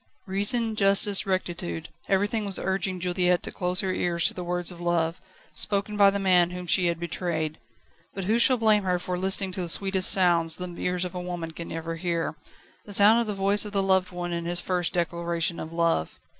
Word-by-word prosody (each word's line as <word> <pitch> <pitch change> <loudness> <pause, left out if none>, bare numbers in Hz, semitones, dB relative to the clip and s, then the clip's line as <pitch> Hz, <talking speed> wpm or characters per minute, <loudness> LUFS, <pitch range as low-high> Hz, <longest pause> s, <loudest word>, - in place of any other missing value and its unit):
Reason, 215 +4 0
justice, 200 0 +3
rectitude 175 - -3 0.2
everything 205 +3 0
was 200 -2 +1
urging 190 -1 -2
Juliette 180 0 0
to - - -6
close 180 +1 +1
her 190 -2 -2
ears 170 -2 -1
to - - +4
the 180 - -6
words 175 0 -1
of 175 -1 -11
love, 170 -1 -1 0.3
spoken 205 0 0
by 200 -1 +6
the 200 - -2
man 180 -3 +3
whom 180 0 -7
she 175 +1 +3
had 170 -1 -2
betrayed. 160 -2 -3 0.6
But 195 - -4
who 220 +5 +1
shall 255 +2 +4
blame 215 -2 +3
her 180 -1 0
for 180 +1 -4
listening 190 +1 +3
to 185 - -5
the 175 - -4
sweetest 190 +1 +3
sound 175 -3 +2
the 175 +1 0
ears 180 0 -1
of 180 - -7
a 180 - -5
woman 175 -2 -5
can 165 +1 -8
ever 165 0 -5
hear 170 -2 -2 0.5
the 205 - -5
sound 210 +4 +6
of 235 - -3
the 210 - -2
voice 200 +1 +1
of 210 -1 -8
the 195 -1 +1
loved 190 -1 +2
one 175 -1 -5
in 170 0 -4
his 175 +1 +2
first 180 -1 -1
declaration 170 -1 -2
of 160 - -7
love? 165 - -1
180 Hz, 210 wpm, -25 LUFS, 170-195 Hz, 0.6 s, by